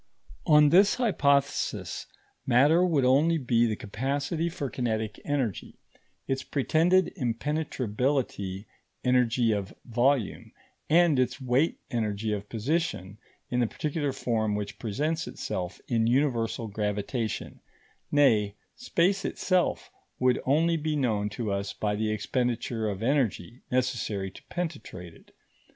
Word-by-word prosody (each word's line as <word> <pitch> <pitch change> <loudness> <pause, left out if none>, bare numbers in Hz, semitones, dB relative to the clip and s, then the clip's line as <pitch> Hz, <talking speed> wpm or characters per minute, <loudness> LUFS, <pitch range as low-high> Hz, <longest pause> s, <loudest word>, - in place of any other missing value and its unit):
] - - -21
On 150 -1 +7
this 195 +6 +5
hypothesis, 140 - 0 0.4
matter 145 +8 +5
would 155 -8 +2
only 150 +6 +4
be 120 -4 +2
the 110 - -1
capacity 140 - -2
for 170 -4 -4
kinetic 110 -4 -2
energy, 135 -8 -2 0.5
its 135 0 -1
pretended 165 +8 +2
impenetrability 125 - -2 0.4
energy 125 -2 +3
of 100 -2 -3
volume, 120 -1 0 0.4
and 165 -3 +5
its 130 +1 0
weight 130 +4 +1
energy 110 -2 -1
of 100 0 -5
position 115 - -2 0.3
in 125 - +1
the 120 - +2
particular 145 +3 -2
form 110 -5 -1
which 105 -1 -5
presents 150 +9 -2
itself 90 -1 -4
in 115 -2 +1
universal 120 -3 +1
gravitation; 105 +2 -3 0.5
nay, 110 -9 +3 0.2
space 195 -4 +1
itself 185 -2 0 0.3
would 125 -1 +2
only 165 +5 +3
be 155 0 -1
known 110 -7 0
to 110 -1 -3
us 100 0 -2
by 105 -1 -1
the 110 +1 -1
expenditure 115 0 -1
of 100 +1 -4
energy 125 -4 0
necessary 120 -6 -1
to - - -14
penetrate 145 - -5
it. - - -20
125 Hz, 125 wpm, -28 LUFS, 110-145 Hz, 0.5 s, On